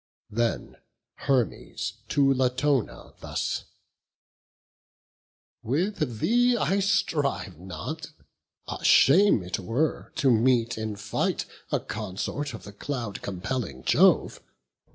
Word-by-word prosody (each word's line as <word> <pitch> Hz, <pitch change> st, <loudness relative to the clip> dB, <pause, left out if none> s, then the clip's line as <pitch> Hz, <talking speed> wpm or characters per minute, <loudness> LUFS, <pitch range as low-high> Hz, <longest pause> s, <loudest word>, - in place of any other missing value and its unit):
Them 115 Hz, +2 st, -1 dB, 0.5 s
Hermes 130 Hz, -5 st, 0 dB, 0.2 s
to 140 Hz, -2 st, +4 dB
Latona 130 Hz, 0 st, 0 dB
thus: -, -, -3 dB, 2.0 s
"With 150 Hz, -, -1 dB
thee 245 Hz, -, +3 dB
I 200 Hz, -2 st, +1 dB
strive 155 Hz, -, 0 dB
not; 90 Hz, 0 st, -6 dB, 0.7 s
shame 165 Hz, -, +6 dB
it 90 Hz, -, -3 dB
were 120 Hz, -, -1 dB
to 140 Hz, -4 st, +3 dB
meet 115 Hz, 0 st, +3 dB
in 110 Hz, -1 st, -4 dB
fight 105 Hz, +1 st, -1 dB, 0.3 s
A -, -, +2 dB
consort 125 Hz, +8 st, -4 dB
of -, -, -11 dB
the 100 Hz, -, -10 dB
cloud 115 Hz, -2 st, -4 dB
compelling 95 Hz, -, -4 dB
Jove. -, -, +4 dB
125 Hz, 95 wpm, -26 LUFS, 105-150 Hz, 2.0 s, shame